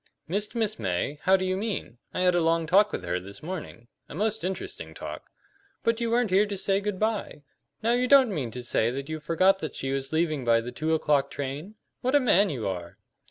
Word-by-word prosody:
"Missed 205 +6 -1
Miss 220 - 0
May? 95 +8 -2
How 190 +1 +6
do 185 - -2
you 185 0 0
mean? 195 - -4
I - - -2
had 180 0 +4
a 175 - +2
long 165 0 +2
talk 200 +6 +4
with - - -4
her 90 - -1
this 100 +7 -10
morning 155 -9 -7 0.2
a - - -8
most 220 +4 -1
interesting 190 +1 -5
talk." - - -8 0.5
"But 230 0 +1
you 235 - 0
weren't 235 -3 +2
here 200 +3 +4
to 200 -1 -4
say 195 +1 +1
good 205 -2 -3
by. 215 -8 -2 0.4
Now 230 - +3
you 250 +1 +2
don't 265 -5 +6
mean 135 -9 -2
to 125 +2 -7
say 115 -1 +1
that 135 +4 -5
you 155 0 -3
forgot 185 +5 +3
that - - -5
she 135 - -3
was 135 0 -2
leaving 155 -3 0
by 115 -1 +4
the 120 +2 -5
two 160 +4 0
o'clock 145 -3 +2
train? 145 +10 -5 0.3
What 255 +3 +1
a - - +7
man 205 -6 +4
you 125 -8 -3
are!" 90 -3 -5
175 Hz, 230 wpm, -27 LUFS, 135-210 Hz, 0.5 s, a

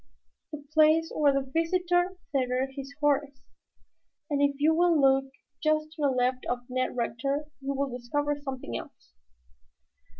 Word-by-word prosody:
"The 295 -1 -7
place 315 +1 +4
where 295 -2 +4
the 275 -1 -1
visitor 355 +3 +1
tethered 260 -1 0
his 275 0 -7
horse. 285 -1 +1 0.9
And 285 -1 +1
if 285 0 +3
you 310 +2 +4
will 340 -1 +3
look 270 -1 +3 0.3
just 310 0 +1
to 310 - -9
the 285 - +3
left 255 0 0
of 245 0 -3
Ned 255 0 -1
Rector, 275 +5 -1 0.2
you 275 +1 -2
will 270 -2 -2
discover 290 +4 -1
something 270 - -6
else." - - -9
280 Hz, 145 wpm, -28 LUFS, 265-310 Hz, 0.9 s, place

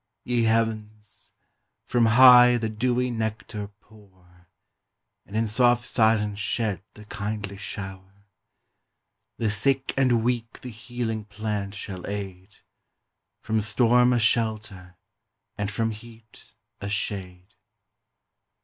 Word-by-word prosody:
Ye 120 -2 0
Heavens! 110 -2 -2 0.5
from 120 -2 +2
high 125 +1 +8
the 110 -1 -2
dewy 125 +3 0
nectar 110 -2 -4
pour, 95 -5 -22 0.8
And 100 - -10
in 110 +1 +1
soft 120 +2 +3
silence 110 -3 +1
shed 105 -3 -2
the 105 - -13
kindly 105 -2 -5
shower! 95 0 -8 1.1
The 110 -2 0
sick 135 +5 +1
and 125 -4 +2
weak 120 -1 -2
the 125 - -7
healing 115 -1 -4
plant 105 -1 -4
shall 95 -2 -7
aid, 100 -1 -7 0.9
From 110 0 0
storm 120 +3 +3
a 125 - +3
shelter, 110 -5 -1 0.6
and 105 -1 -3
from 115 +2 -1
heat 110 0 -14 0.2
a 100 - -5
shade. 95 -2 -4
110 Hz, 110 wpm, -25 LUFS, 100-115 Hz, 1.1 s, high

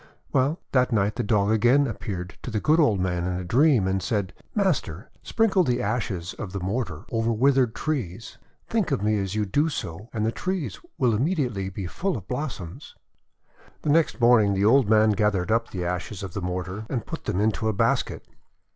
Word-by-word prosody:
Well, 140 +5 +2
that 125 -1 +2
night 105 -2 +1
the - - -1
Dog 105 -2 +2
again 120 +6 +4
appeared 95 -6 -5
to - - -6
the 110 -2 -1
good 155 +8 +3
old 115 - +3
man 90 -1 -1
in 90 +1 -1
a 90 +1 -3
dream, 125 - +3
and 95 0 0
said: 100 -1 -2
— - - -39
* - - -38
Master, 140 - -1
sprinkle 210 -5 +2
the 125 -5 0
ashes 100 -5 -2
of 100 -5 -6
the 100 - -2
mortar 95 -4 -3
over 115 0 +1
withered 130 0 +3
trees. 115 - -4 0.3
Think 220 -7 0
of 135 -8 -1
me 105 0 +2
as 95 0 -3
you 105 -1 +1
do 145 +11 +1
so, 100 - -6
and 110 -1 -1
the 110 - +1
trees 185 +2 -3 0.2
will 125 -3 +2
immediately 120 - 0
be 95 0 -6
full 180 - -2
of 95 - -10
blos 140 +2 -3
soms.' 85 -4 -10 0.9
The 150 - +1
next 160 -2 +2
morning 115 -4 +5
the 100 +1 +1
old 120 0 +5
man 110 0 +5
gathered 105 -2 +1
up 115 +1 +1
the 90 -2 -4
ashes 90 +3 -4
of 95 -4 -6
the 100 - -4
mortar, 90 +4 -4
and 120 -5 -2
put 165 - -7
them 100 -3 -1
into 110 +1 +1
a - - +3
basket. - - 0
110 Hz, 210 wpm, -25 LUFS, 95-130 Hz, 0.9 s, morning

